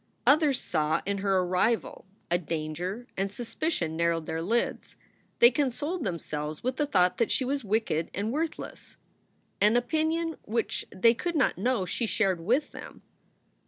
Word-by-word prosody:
Others 290 -3 +4
saw 155 -2 0
in 200 0 -1
her 195 -1 +2
a 185 - +2
rival, 190 +3 0 0.2
a 175 - +3
danger; 170 +7 -4
and 195 +1 -1
suspicion 230 - -2
narrowed 170 -1 +1
their 160 +1 -3
lids. 230 +8 -1 0.4
They 235 - +7
consoled 290 +6 -1
themselves 155 -4 -4
with 255 +1 -1
the 295 - +1
thought 180 -10 +2
that 230 - +2
she 260 - +1
was 275 +1 -1
wicked 205 -6 0
and 205 +3 -2
worthless 315 +4 -4 0.6
an 210 +3 +5
opinion 315 +6 0
which 230 +1 -2
they 230 +5 +4
could 340 +8 -3
not 280 - +2
know 240 -2 +1
she 225 +6 -2
shared 195 -5 +1
with 245 - +1
them. - - -10
220 Hz, 160 wpm, -28 LUFS, 180-260 Hz, 0.6 s, They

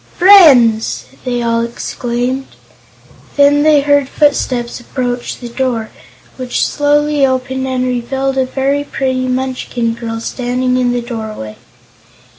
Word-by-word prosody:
"Friends!" 275 - +5 0.2
they 245 -1 -1
all 230 0 +1
exclaimed. 245 +2 -3 0.9
Then 285 0 +5
they 300 -1 +4
heard 285 -1 +2
footsteps 255 -5 0
approach 245 0 -4
the 245 - -8
door, 235 -2 -3 0.5
which 255 -2 -1
slowly 295 0 +1
opened 260 0 -1
and 255 -1 -1
revealed 265 +2 -2
a 260 - +2
very 275 +2 -1
pretty 260 -2 -2
Munchkin 255 -2 -2
girl 225 -1 -5
standing 250 +2 -2
in 250 -1 +1
the 245 -1 -2
doorway. 220 - -6
255 Hz, 120 wpm, -14 LUFS, 240-270 Hz, 0.9 s, Friends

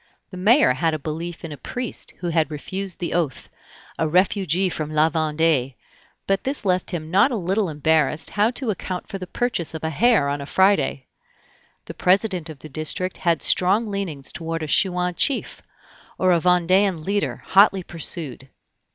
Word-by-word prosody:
The 185 - -8
mayor 210 - +4
had 160 +4 0
a - - -2
belief 165 +4 -6
in 160 - -7
a 145 - -7
priest 245 - -5
who 175 - -4
had 160 -2 +1
refused 190 +5 -5
the 175 - -4
oath, 160 -7 -2 0.5
a 160 - +1
refugee 185 +1 +2
from 155 -4 -3
La 155 +1 +2
Vendée; 155 -4 +1 0.5
but 195 0 0
this 270 -4 -2
left 185 -1 +1
him 160 -3 -5
not 200 +8 +5
a 250 - -2
little 195 0 0
embarrassed 155 0 +1
how 210 +2 +2
to 245 -1 0
account 185 -2 -5
for 195 - -6
the 185 - -7
purchase 180 -8 -2
of 160 - -7
a 160 - -1
hare 220 - +3
on 140 0 -2
a 140 - -7
Friday. 190 -9 +2 0.8
The - - -8
president 185 -3 +1
of 155 - -9
the 155 - -11
district 155 +5 -1
had 170 -2 0
strong 205 +4 +3
leanings 170 -9 -4
toward 165 0 -4
a - - -4
Chouan 180 +2 +1
chief, 270 +9 0 0.6
or 185 0 +2
a 170 - +4
Vendean 180 0 +2
leader 200 +1 -2
hotly 195 -1 +4
pursued. 155 -6 -4
175 Hz, 175 wpm, -22 LUFS, 155-195 Hz, 0.8 s, not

